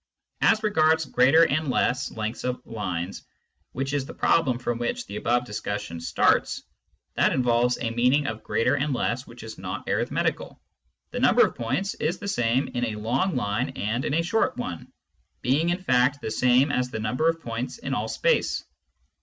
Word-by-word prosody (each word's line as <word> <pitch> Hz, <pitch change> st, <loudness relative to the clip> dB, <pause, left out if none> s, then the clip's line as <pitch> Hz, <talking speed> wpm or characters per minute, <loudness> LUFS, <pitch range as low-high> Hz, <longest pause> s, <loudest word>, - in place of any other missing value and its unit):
As 220 Hz, -1 st, +4 dB
regards 160 Hz, -6 st, +3 dB
greater 135 Hz, +7 st, +5 dB
and 155 Hz, -1 st, +1 dB
less 125 Hz, 0 st, +1 dB
lengths 110 Hz, +1 st, -4 dB
of 125 Hz, 0 st, -3 dB
lines, 95 Hz, -4 st, -4 dB, 0.5 s
which 135 Hz, +2 st, -3 dB
is 145 Hz, -2 st, 0 dB
the -, -, -9 dB
problem 135 Hz, -7 st, +2 dB
from 120 Hz, -1 st, -3 dB
which 245 Hz, -, -2 dB
the -, -, -7 dB
above 120 Hz, +1 st, +1 dB
discussion 105 Hz, -6 st, -4 dB
starts, 85 Hz, -, +1 dB, 0.5 s
that -, -, +3 dB
involves 125 Hz, -1 st, +2 dB
a 115 Hz, -, -2 dB
meaning 125 Hz, +5 st, +2 dB
of 110 Hz, -2 st, -4 dB
greater 115 Hz, -, +1 dB
and 145 Hz, 0 st, 0 dB
less 125 Hz, +2 st, -2 dB
which 120 Hz, +1 st, -12 dB
is 110 Hz, 0 st, -9 dB
not -, -, -6 dB
arithmetical. -, -, -1 dB, 0.5 s
The -, -, -3 dB
number -, -, +5 dB
of -, -, -4 dB
points 180 Hz, +12 st, -2 dB
is 170 Hz, +4 st, -2 dB
the 200 Hz, -, -7 dB
same 120 Hz, -7 st, +1 dB
in 120 Hz, -, -3 dB
a 110 Hz, -2 st, -3 dB
long 120 Hz, -, 0 dB
line 105 Hz, -4 st, -1 dB
and 110 Hz, +5 st, -2 dB
in 145 Hz, -, -1 dB
a 165 Hz, -, +2 dB
short 200 Hz, -, 0 dB
one, 85 Hz, -9 st, -6 dB, 0.5 s
being 145 Hz, +7 st, +2 dB
in 180 Hz, +2 st, -1 dB
fact 130 Hz, -1 st, +3 dB
the 110 Hz, -, -4 dB
same 125 Hz, +4 st, +3 dB
as 125 Hz, -2 st, 0 dB
the 110 Hz, -, -5 dB
number 125 Hz, +9 st, +1 dB
of 165 Hz, 0 st, -1 dB
points 120 Hz, -, -5 dB
in 235 Hz, -, -4 dB
all -, -, -1 dB
space. -, -, 0 dB
125 Hz, 185 wpm, -25 LUFS, 115-155 Hz, 0.5 s, greater